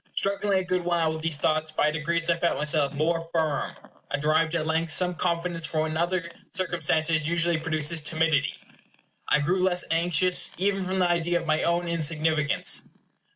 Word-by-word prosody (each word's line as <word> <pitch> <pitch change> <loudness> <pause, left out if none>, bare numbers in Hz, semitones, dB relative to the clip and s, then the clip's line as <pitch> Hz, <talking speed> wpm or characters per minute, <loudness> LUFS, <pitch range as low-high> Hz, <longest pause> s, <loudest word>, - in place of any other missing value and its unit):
Struggling 200 0 +1
a 190 - 0
good 185 -1 -1
while 170 -2 +1
with 160 - -6
these 165 -1 0
thoughts, 155 +1 0
by 150 -1 +1
degrees 165 +2 -1
I 170 - +3
felt 170 0 0
myself 150 -1 +1
more 165 +3 -1
firm. 160 -3 -1 0.3
I 145 - -1
derived, 155 +3 +1
at 160 -2 -1
length, 160 +1 0
some 180 +4 +2
confidence 170 -1 -1
from 155 - -1
what 155 0 -1
in 155 - -3
other 175 0 -1 0.2
circumstances 160 -3 +1
usually 170 0 +1
produces 155 0 +1
timidity. 155 -2 +1 0.7
I 150 - +3
grew 180 +6 0
less 180 -1 +2
anxious, 175 +2 +2
even 195 0 0
from 185 +1 -2
the 180 -1 +3
idea 175 0 +1
of - - -8
my 155 -1 +1
own 170 +1 0
insignificance. 155 -2 0
165 Hz, 180 wpm, -26 LUFS, 155-175 Hz, 0.7 s, I